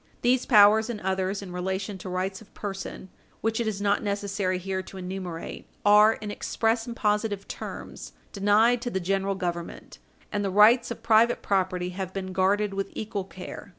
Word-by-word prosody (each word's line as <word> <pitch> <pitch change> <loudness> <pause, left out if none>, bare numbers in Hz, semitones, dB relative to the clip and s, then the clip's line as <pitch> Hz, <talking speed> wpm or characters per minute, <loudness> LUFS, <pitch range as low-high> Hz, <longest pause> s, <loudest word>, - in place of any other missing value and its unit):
These 250 +1 +2
powers, 215 0 +6
and 230 -3 -4
others 190 +1 -1
in 180 -2 -8
relation 190 +2 -3
to 185 - -7
rights 185 +2 -3
of 220 - -17
person 195 -1 -6 0.3
which 225 +1 0
it 235 - -1
is 210 -2 -2
not 200 0 +1
necessary 200 -2 -1
here 190 +1 -3
to 190 - -11
enumerate, 180 -2 -6 0.2
are, 210 +1 +7
in 210 -1 -6
express 225 +2 -1
and 235 - -5
positive 210 -2 0
terms, - - -8 0.2
denied 215 +4 +3
to 245 - -2
the 190 - -2
General 195 +2 0
Government, 175 -2 -5 0.3
and 205 -1 -1
the 195 - 0
rights 215 +5 +5
of 225 - -7
private 230 +1 +4
property 185 -2 0
have 185 0 -5
been 190 -1 -4
guarded 195 +2 +2
with 195 0 -3
equal 210 -3 -4
care. 190 +2 -9
200 Hz, 180 wpm, -26 LUFS, 190-215 Hz, 0.3 s, are